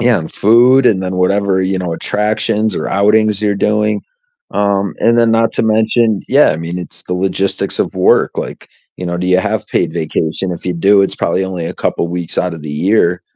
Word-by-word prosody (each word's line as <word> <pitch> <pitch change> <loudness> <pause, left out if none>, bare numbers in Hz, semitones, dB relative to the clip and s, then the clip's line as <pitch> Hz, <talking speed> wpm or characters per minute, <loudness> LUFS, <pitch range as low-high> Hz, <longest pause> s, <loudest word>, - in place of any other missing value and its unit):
Yeah, 120 -1 +3
on 80 - -6
food, 125 +5 +4
and 95 -5 +2
then 95 0 -4
whatever, 95 +1 +1
you 95 +1 -1
know, 90 -2 -3
attractions 110 +3 0
or - - -3
outings 105 +1 +2
you're 105 -1 +1
doing. 105 0 0 0.5
Um, 100 -3 -1
and 115 +1 +2
then 115 -1 +3
not 115 0 +1
to - - 0
mention 110 -1 +1
yeah, - - +4
I - - -2
mean, 85 +2 -5
it's 90 - -2
the 90 - -5
logistics 95 +1 0
of - - -2
work, - - +2
like, - - -7 0.3
you 90 - -7
know, 85 0 -3
do 90 +1 -3
you 90 0 +3
have - - -2
paid - - -1
vacation? 80 +2 -2
If 85 - -8
you 90 - 0
do, 100 +3 +3
it's 95 - 0
probably 95 +3 -1
only 90 -3 -5
a - - -6
couple - - -2
weeks 85 -1 -2
outta 90 -3 -2
the 75 -1 -8
year, 90 +2 +1
95 Hz, 210 wpm, -14 LUFS, 90-110 Hz, 0.5 s, food